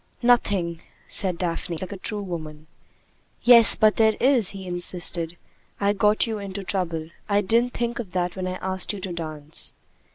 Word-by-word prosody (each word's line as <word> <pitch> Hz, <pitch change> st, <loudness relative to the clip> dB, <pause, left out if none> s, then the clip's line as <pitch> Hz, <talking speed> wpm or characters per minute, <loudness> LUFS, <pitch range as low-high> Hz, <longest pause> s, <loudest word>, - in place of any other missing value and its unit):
"Nothing," 195 Hz, -9 st, +2 dB, 0.3 s
said 185 Hz, -3 st, +1 dB
Daphne, 170 Hz, -1 st, -3 dB
like 185 Hz, +4 st, -7 dB
a -, -, -5 dB
true 205 Hz, +2 st, -4 dB
woman. 155 Hz, -4 st, -7 dB, 0.8 s
"Yes, 235 Hz, -3 st, +9 dB
but 215 Hz, -1 st, +3 dB
there 220 Hz, -1 st, +4 dB
is," 250 Hz, -6 st, +4 dB
he 195 Hz, -1 st, -7 dB
insisted. 175 Hz, -1 st, -2 dB, 0.4 s
"I 200 Hz, 0 st, +2 dB
got 210 Hz, +1 st, +3 dB
you 220 Hz, -2 st, -4 dB
into 200 Hz, 0 st, -6 dB
trouble. 170 Hz, -4 st, -3 dB, 0.2 s
I 205 Hz, 0 st, +3 dB
didn't 230 Hz, +5 st, +1 dB
think 235 Hz, 0 st, -2 dB
of 210 Hz, -7 st, -6 dB
that 180 Hz, -1 st, -1 dB
when 185 Hz, -1 st, -4 dB
I 185 Hz, -, -3 dB
asked 190 Hz, +2 st, -2 dB
you 205 Hz, -, -6 dB
to 185 Hz, -1 st, -5 dB
dance." 155 Hz, -2 st, -4 dB
190 Hz, 170 wpm, -24 LUFS, 175-210 Hz, 0.8 s, Yes